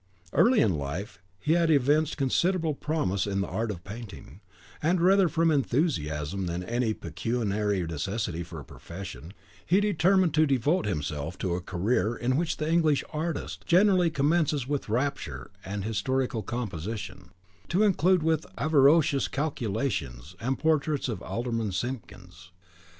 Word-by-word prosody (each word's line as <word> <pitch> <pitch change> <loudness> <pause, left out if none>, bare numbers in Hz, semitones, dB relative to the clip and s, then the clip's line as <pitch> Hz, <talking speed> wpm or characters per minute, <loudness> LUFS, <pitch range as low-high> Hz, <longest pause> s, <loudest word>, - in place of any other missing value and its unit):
Early 245 -1 +5
in 90 -8 +2
life 90 +9 -5 0.2
he 155 - +1
had 170 -1 +3
evinced 150 +2 +3
considerable 160 +4 +1
promise 140 - -1
in 100 -1 -1
the - - -2
art 110 +5 -2
of 90 -5 -5
painting, 100 - -10 0.4
and 175 +4 +2
rather 190 +1 +4
from 165 +1 +2
enthusiasm 95 - 0
than 85 +1 -3
any 115 +2 -1
pecuniary 105 -5 -1
necessity 85 +3 -3
for 85 -2 -7
a 70 - -10
profession, 90 -2 -9 0.3
he 185 +4 +3
determined 190 -3 +3
to 155 0 +4
devote 140 - +1
himself 75 -1 -3
to 90 -3 -2
a 90 - -2
career 105 +6 0
in 125 +2 0
which 165 +2 0
the 155 - -2
English 160 -3 +3
artist 160 +2 -3
generally 185 -1 +4
commences 150 -2 +1
with 145 -5 -2
rapture 110 - -2
and 100 +1 -4
historical 115 +3 -1
composition, 105 -2 -5 0.4
to 180 +4 +2
conclude 185 -4 +3
with 160 -1 +1
avaricious 145 0 +4
calculation 110 - -2 0.2
and 130 +4 -1
portraits 155 -3 +1
of 115 - -4
Alderman 115 -3 -2
Simpkins. 90 -6 -6
125 Hz, 140 wpm, -27 LUFS, 95-155 Hz, 0.4 s, Early